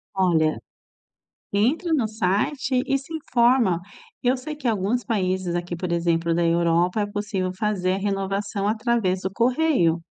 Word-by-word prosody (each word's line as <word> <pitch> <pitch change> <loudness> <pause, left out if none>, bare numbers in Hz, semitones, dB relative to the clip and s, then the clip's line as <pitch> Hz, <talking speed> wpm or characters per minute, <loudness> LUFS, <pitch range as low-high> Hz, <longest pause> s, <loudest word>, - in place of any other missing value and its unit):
Olha, 165 -5 +2 1.0
entre 275 - +1
no 245 -8 +2
site 220 +6 0
e 275 - +1
se 275 +4 -10
informa. 240 - +2 0.4
Eu 250 +2 +2
sei 300 +4 -6
que 285 -4 -4
alguns 220 +3 0
países 185 -5 -1
aqui, 175 0 -3
por 175 +1 -4
exemplo, 170 -1 +1
da 170 0 +1
Europa 170 +4 +2
é - - +1
possível 205 -3 -2
fazer 190 -3 0
a - - -1
renovação 195 0 -2
através 215 -4 0
do 190 - -3
correio. 235 - +2
200 Hz, 150 wpm, -24 LUFS, 180-240 Hz, 1.0 s, Olha